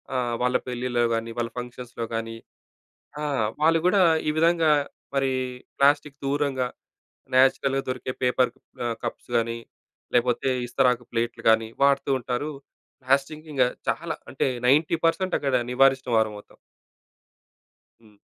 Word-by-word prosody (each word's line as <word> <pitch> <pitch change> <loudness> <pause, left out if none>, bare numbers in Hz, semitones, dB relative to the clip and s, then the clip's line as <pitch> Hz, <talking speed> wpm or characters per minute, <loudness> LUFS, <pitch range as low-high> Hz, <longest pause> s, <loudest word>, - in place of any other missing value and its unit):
ఆహ్, 120 -2 0
వాళ్ళ 125 0 +3
పెళ్ళిలో 125 -1 -1
గాని 115 0 -3
వాళ్ళ 115 -1 -1
ఫంక్షన్స్‌లో 125 -1 -6
గాని 115 0 -4 0.9
ఆ! - - -2 0.4
వాళ్ళు 165 +1 +5
కూడా 195 +2 +3 0.3
ఈ - - +4
విధంగా 165 -1 +3 0.4
మరి 135 -1 +1 0.5
ప్లాస్టిక్ 145 0 +3
దూరంగా, 140 -2 0 0.7
నేచురల్‍గా 135 +1 +3
దొరికే 130 0 -3
పేపర్ 125 0 +2 0.3
ఆహ్, 115 -1 -1
కప్స్ - - -5
గాని, 115 0 -1 0.6
లేకపోతే, 125 +2 +2 0.2
ఇస్తరాకు 125 0 +2
ప్లేట్‌లు 120 0 -2
గాని 110 0 +3
వాడుతూ 140 0 +3
ఉంటారు. 125 +5 -3 0.5
ప్లాస్టిక్ 140 +4 0
ఇంకా 130 -3 +3 0.2
చాలా 165 0 -2 0.2
అంటే 135 - 0 0.2
90% 165 +5 +2
అక్కడ 135 -2 0 0.2
నివారించినవారమవుతాం. 125 -5 +1 1.5
హ్మ్. 105 -2 -21
130 Hz, 115 wpm, -25 LUFS, 120-140 Hz, 1.5 s, వాళ్ళు